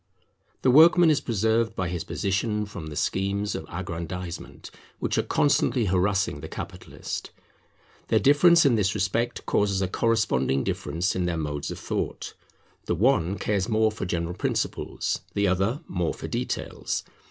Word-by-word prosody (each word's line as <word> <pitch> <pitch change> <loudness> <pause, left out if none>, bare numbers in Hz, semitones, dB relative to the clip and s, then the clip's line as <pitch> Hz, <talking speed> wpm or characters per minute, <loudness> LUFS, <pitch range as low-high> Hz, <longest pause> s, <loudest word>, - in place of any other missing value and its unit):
The 130 - +5
workman 165 +4 +7
is 145 -1 +1
preserved 110 -1 +1
by 95 - -1
his 85 -1 -3
position 105 +3 -1
from 85 -6 -8
the 75 - -7
schemes 100 +5 -1
of - - -5
aggrandisement, 85 0 -6 0.3
which - - -1
are - - +4
constantly 125 -4 +2
harassing 95 -3 +1
the 80 - -7
capitalist. - - -6 0.8
Their - - +3
difference 170 +4 +6
in 135 - +5
this 100 -3 +1
respect 115 +5 -1
causes 100 -2 +1
a 95 - 0
corresponding 110 - +1
difference 85 +5 -2
in 90 -1 0
their 85 -1 -1
modes 75 -2 -3
of - - -5
thought; - - -4 0.5
the 85 - 0
one 100 -3 +2
cares 100 +2 -1
more 110 0 +3
for 105 - -5
general 85 -1 -2
principles, - - -2
the 100 0 +2
other 95 - 0
more 90 -3 -1
for - - -7
details. - - -3
100 Hz, 155 wpm, -26 LUFS, 90-115 Hz, 0.8 s, workman